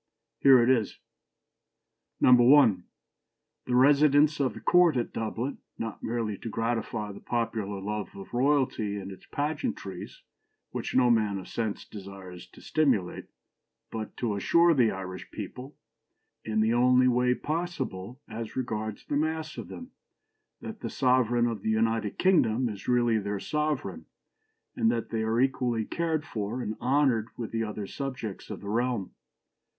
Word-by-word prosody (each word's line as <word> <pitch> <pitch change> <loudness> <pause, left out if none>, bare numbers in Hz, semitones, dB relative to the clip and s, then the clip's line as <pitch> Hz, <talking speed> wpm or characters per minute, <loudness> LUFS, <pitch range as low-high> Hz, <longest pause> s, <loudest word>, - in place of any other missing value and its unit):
Here 130 -3 +7
it - - +2
is. 115 -5 +1 1.2
"1. 125 -6 +6 0.8
The 125 - +1
residence 145 +3 +5
of 135 -2 0
the - - -7
Court 175 -5 +4
at 120 - -2
Dublin, 115 +4 -3 0.2
not 115 -1 -5
merely 110 -3 -2
to 115 - -6
gratify 115 -2 -2
the 100 - -10
popular 110 -4 -2
love 105 +1 -4
of 100 +3 -10
royalty 125 -6 +1
and 100 -1 -6
its 95 - -13
pageantries, 145 - -4 0.5
which - - -4
no 125 -1 +5
man 105 -3 +2
of 95 - -8
sense 110 -3 -3
desires 95 -3 -10
to - - -17
stimulate, 125 -13 0 0.7
but 110 -1 -6
to 115 -4 -1
assure 170 +11 +4
the 125 -6 +4
Irish 95 -2 -6
people, 130 +3 -8 0.7
in 110 0 0
the 110 +1 +2
only 125 +1 +4
way 125 0 +3
possible 135 - -4
as 115 0 -6
regards 110 -4 -3
the 145 - -2
mass 155 +1 -1
of - - -7
them, 255 +1 -9 0.7
that 220 -1 -7
the - - -4
sovereign 125 -2 +2
of 115 -4 -2
the 110 - -2
United 110 -1 0
Kingdom 130 -10 +3
is 100 -3 -8
really 120 -2 +3
their 100 0 -3
sovereign, 140 - -2 0.7
and 115 - +2
that 115 -1 -3
they 115 -1 -1
are 110 +1 0
equally 125 -4 +1
cared 160 0 -1
for 110 +3 -4
and 110 -3 -3
honoured 130 -4 +2
with 115 -2 -5
the 115 0 -1
other 105 -1 -4
subjects 125 -4 -6
of - - -6
the 100 - -8
realm. 120 -3 -1
120 Hz, 150 wpm, -28 LUFS, 105-130 Hz, 1.2 s, Here